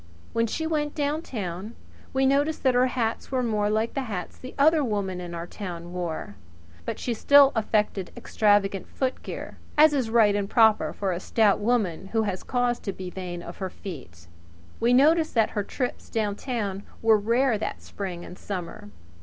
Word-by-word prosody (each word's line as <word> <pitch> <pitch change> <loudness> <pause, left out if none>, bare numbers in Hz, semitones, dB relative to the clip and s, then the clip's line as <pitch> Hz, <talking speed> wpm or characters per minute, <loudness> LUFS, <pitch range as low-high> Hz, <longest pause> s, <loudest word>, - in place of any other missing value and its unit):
When 230 0 +2
she 320 +8 -3
went 300 -2 -1
down 295 +1 0
town 200 - -5 0.4
we 265 0 +2
noticed 285 +3 +1
that 260 -2 +4
her 250 +1 +4
hats 235 -2 -2
were 255 -1 +1
more 210 -3 +1
like 220 +2 0
the 275 - -1
hats 180 -4 -5
the 255 - -10
other 305 +2 +5
women 200 -6 -2
in 175 -1 -6
our 170 0 -4
town 175 -2 -7
wore; 170 - -4 0.5
but - - -3
she 245 - -2
still 280 +4 +6
affected 210 -4 0
extravagant 205 -2 +2
footgear, 260 -1 -4 0.2
as 305 0 +7
is 260 -5 0
right 220 -3 +4
and 200 -1 -1
proper 220 -2 +4
for 195 -2 -2
a 175 - -2
stout 210 +1 +2
woman 205 -6 0
who 225 -1 +2
has 195 -3 -2
cause 245 -1 0
to 200 - -4
be 185 -1 -7
vain 175 -2 -6
of 170 - -9
her 190 -1 -3
feet. 125 - -10 0.5
We 235 - +3
noticed 310 +5 +4
that 225 -2 +3
her 205 - -1
trips 250 +4 -4
down 210 -3 -1
town 205 -6 -3 0.2
were 220 -1 +5
rare 230 +2 +2
that - - -4
spring 180 -4 -6
and 180 - -11
summer. 190 +1 -6
215 Hz, 185 wpm, -26 LUFS, 190-255 Hz, 0.5 s, as